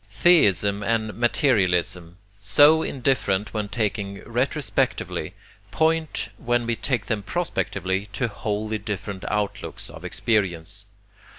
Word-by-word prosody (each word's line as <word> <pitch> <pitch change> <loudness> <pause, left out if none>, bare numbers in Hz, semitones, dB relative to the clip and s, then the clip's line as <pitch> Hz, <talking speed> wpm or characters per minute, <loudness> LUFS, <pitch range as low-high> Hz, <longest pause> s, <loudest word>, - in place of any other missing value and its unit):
Theism 105 - +4
and 110 0 0
materialism, 95 - +1 0.2
so 145 +11 +5
indifferent 120 -9 0
when 105 -2 -2
taken 100 -3 -2
retrospectively, 130 +5 -1 0.3
point, 160 -1 0
when 120 -1 0
we 115 0 0
take 120 -2 -1
them 110 -3 -1
prospectively, 100 - -2
to 120 +3 0
wholly 110 0 -3
different 100 -2 -5
outlooks 105 -1 -3
of - - -11
experience. 100 -1 -1
105 Hz, 105 wpm, -24 LUFS, 100-120 Hz, 0.3 s, so